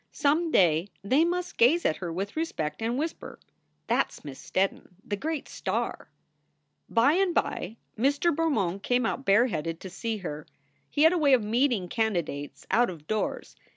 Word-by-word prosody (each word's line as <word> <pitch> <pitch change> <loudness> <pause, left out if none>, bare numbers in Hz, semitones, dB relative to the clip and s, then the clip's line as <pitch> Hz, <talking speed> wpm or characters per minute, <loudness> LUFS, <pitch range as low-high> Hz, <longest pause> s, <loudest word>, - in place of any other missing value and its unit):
Some 305 +3 +1
day 170 - +3 0.2
they 265 +10 +3
must 355 +1 -2
gaze 295 +9 +5
at 155 - +2
her 175 -3 -5
with 195 +4 -4
respect 160 - -3
and 230 +2 -1
whisper, 320 +3 -4 0.5
"That - - +2
s - - -15
Miss 135 -2 -8
Steddon, 190 -1 -1
the 205 - -2
great 310 +7 -3
star." - - -3 0.8
By 235 +6 +4
and 365 0 +1
by 215 +6 -1 0.2
Mr. 285 +8 +2
Bermond 210 - 0
came 245 +3 +1
out 270 +4 -2
bareheaded 195 -7 +2
to 190 - -8
see 225 +4 -3
her. 150 -1 -5 0.4
He 290 - +2
had 320 +2 +7
a 355 - +1
way 285 -3 +4
of 245 -4 +4
meeting 230 -3 +1
candidates 175 -10 -2
out 240 +5 +4
of 160 -5 -9
doors. 215 +5 -3
230 Hz, 170 wpm, -27 LUFS, 185-290 Hz, 0.8 s, had